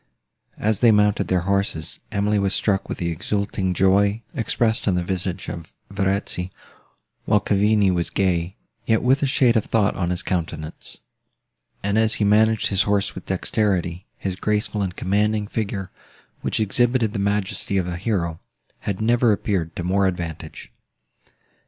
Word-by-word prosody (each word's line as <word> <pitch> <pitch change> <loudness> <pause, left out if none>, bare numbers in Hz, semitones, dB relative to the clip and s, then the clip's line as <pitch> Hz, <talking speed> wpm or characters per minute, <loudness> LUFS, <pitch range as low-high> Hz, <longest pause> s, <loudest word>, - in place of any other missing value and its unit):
As 110 -1 +1
they 120 - +6
mounted 105 -1 +3
their 90 -1 +1
horses, 100 -4 -1
Emily 105 +1 +1
was 100 0 +2
struck 100 -2 0
with - - -3
the 85 -1 -2
exulting 95 +2 -1
joy, 100 +4 +3
expressed 115 0 0
on 95 - +3
the 90 - 0
visage 90 0 -3
of 85 -2 -7 0.2
Verezzi, 95 -2 -1 0.8
while 105 - +4
Cavigni 105 0 +3
was 85 -1 -1
gay, 90 -1 0 0.3
yet 110 -1 +2
with 130 +3 +3
a 140 - +2
shade 130 -3 +3
of 110 - +2
thought 105 -3 +1
on 85 -2 -1
his 90 -1 -2
countenance; 80 -3 -4 0.9
and, 100 +2 +1
as 110 0 +2
he - - -1
managed 110 +2 +3
his 100 -1 +2
horse 100 -1 +1
with - - -10
dexterity, 95 -2 -1
his 95 -2 -3
graceful 105 +1 -1
and 95 -2 -2
commanding 105 +2 +1
figure, 100 -3 -3 0.5
which - - -1
exhibited 115 +1 +1
the 105 - -2
majesty 100 0 -1
of 90 -2 0
a 90 - -3
hero, 85 -4 -2 0.4
had 100 0 -3
never 120 +1 +3
appeared 95 -5 -1
to 90 - -4
more 95 +2 +2
advantage. 85 -4 -5
100 Hz, 160 wpm, -22 LUFS, 90-105 Hz, 0.9 s, they